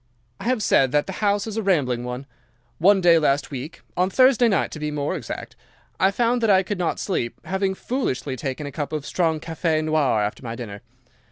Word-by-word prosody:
"'I -, -, -8 dB
have 245 Hz, -3 st, +1 dB
said 135 Hz, -7 st, +3 dB
that 145 Hz, 0 st, +3 dB
the 190 Hz, -, -6 dB
house 205 Hz, -1 st, +2 dB
is 220 Hz, -1 st, -5 dB
a -, -, +1 dB
rambling 140 Hz, -, +1 dB
one. 125 Hz, +2 st, -5 dB, 0.5 s
One 195 Hz, +3 st, +5 dB
day 170 Hz, -2 st, +6 dB
last 145 Hz, -2 st, +1 dB
week—on 155 Hz, +6 st, -3 dB
Thursday 255 Hz, +2 st, +5 dB
night, 200 Hz, -, +1 dB
to 155 Hz, -, -7 dB
be 150 Hz, 0 st, -2 dB
more 150 Hz, +3 st, -2 dB
exact—I 180 Hz, -, -4 dB
found 240 Hz, +4 st, +1 dB
that 225 Hz, -, +2 dB
I 190 Hz, -1 st, +5 dB
could 195 Hz, 0 st, -4 dB
not 175 Hz, -, -1 dB
sleep, 120 Hz, -, -2 dB
having 190 Hz, 0 st, -1 dB
foolishly 150 Hz, -, -2 dB
taken 135 Hz, +3 st, -4 dB
a 145 Hz, -, -5 dB
cup 145 Hz, +1 st, -4 dB
of 150 Hz, -2 st, -3 dB
strong 160 Hz, -2 st, 0 dB
café 160 Hz, -1 st, -1 dB
noir 155 Hz, -8 st, +2 dB
after 105 Hz, -, -3 dB
my 115 Hz, -1 st, -5 dB
dinner. 105 Hz, -4 st, -7 dB
160 Hz, 200 wpm, -23 LUFS, 140-195 Hz, 0.5 s, day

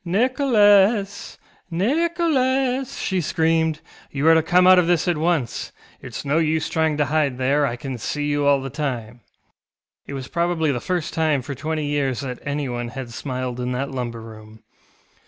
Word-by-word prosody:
ŌĆ£Nicholas, 205 Hz, -2 st, +2 dB, 0.3 s
Nicholas! 265 Hz, -, +1 dB
ŌĆØ -, -, -7 dB
she 185 Hz, -1 st, 0 dB
screamed, 160 Hz, -1 st, +1 dB, 0.3 s
ŌĆ£you 140 Hz, +1 st, -2 dB
are 165 Hz, -, +7 dB
to 160 Hz, -, +4 dB
come 180 Hz, +3 st, +3 dB
out 185 Hz, 0 st, +8 dB
of 175 Hz, -, +1 dB
this 175 Hz, 0 st, +2 dB
at 175 Hz, -, +2 dB
once. 155 Hz, -6 st, -1 dB, 0.3 s
ItŌĆÖs -, -, -7 dB
no 145 Hz, +3 st, +2 dB
use 160 Hz, -1 st, 0 dB
trying 160 Hz, -2 st, 0 dB
to 150 Hz, -, +2 dB
hide 145 Hz, -3 st, 0 dB
there; 140 Hz, +3 st, +2 dB
I 120 Hz, -, -3 dB
can 125 Hz, 0 st, -6 dB
see 145 Hz, +6 st, -3 dB
you 145 Hz, -1 st, 0 dB
all 140 Hz, -1 st, +4 dB
the 135 Hz, -1 st, -6 dB
time. 120 Hz, -6 st, -4 dB
ŌĆØ -, -, -27 dB, 0.9 s
It -, -, -7 dB
was 130 Hz, -1 st, -6 dB
probably 170 Hz, -2 st, 0 dB
the 125 Hz, -, -2 dB
first 180 Hz, -4 st, -2 dB
time 155 Hz, -5 st, +1 dB
for 140 Hz, -, -5 dB
twenty 155 Hz, +3 st, -3 dB
years 145 Hz, -3 st, -1 dB
that 125 Hz, -3 st, -5 dB
anyone 135 Hz, -4 st, -3 dB
had 125 Hz, 0 st, -7 dB
smiled 125 Hz, -1 st, -4 dB
in 125 Hz, 0 st, -2 dB
that 135 Hz, +2 st, -3 dB
lumber 120 Hz, -3 st, -4 dB
room. 110 Hz, -1 st, -13 dB
150 Hz, 180 wpm, -22 LUFS, 130-175 Hz, 0.9 s, out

